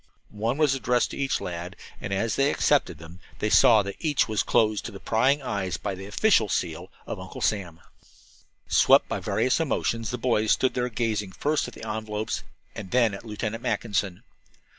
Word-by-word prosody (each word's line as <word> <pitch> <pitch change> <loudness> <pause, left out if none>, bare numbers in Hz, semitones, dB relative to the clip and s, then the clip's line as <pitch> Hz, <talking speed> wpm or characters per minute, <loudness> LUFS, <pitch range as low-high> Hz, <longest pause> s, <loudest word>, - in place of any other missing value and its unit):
One 115 +5 -1
was 150 -3 +3
addressed 125 -2 +1
to - - -7
each 135 -1 0
lad, 90 0 -6 0.3
and - - -5
as 100 +3 0
they 140 +1 +3
accepted 140 - +1
them 80 +3 -12 0.2
they 105 - -1
saw 110 -3 +6
that 100 0 -6
each 150 -7 +1
was 110 -2 0
closed 110 -3 +1
to 100 -4 -7
prying 135 +8 +1
eyes 95 -8 -2
by 100 - -4
the 95 +1 -8
official 110 - +3
seal 85 0 -2 0.2
of - - -5
Uncle - - -9
Sam. 90 -6 -1 0.9
Swept - - +5
by - - -3
various - - +1
emotions, 115 -2 -1
the 125 - -3
boys 115 -3 +2
stood 130 - +1
there 125 0 -1
gazing 110 -4 -2
first 150 -1 0
at 125 - -10
the 110 - -8
envelopes 110 0 -3 0.3
and 95 - -8
then 120 -2 +3
at 100 - -8
Lieutenant 110 +1 -4
Mackinson. 100 -7 -2
110 Hz, 185 wpm, -26 LUFS, 100-125 Hz, 0.9 s, saw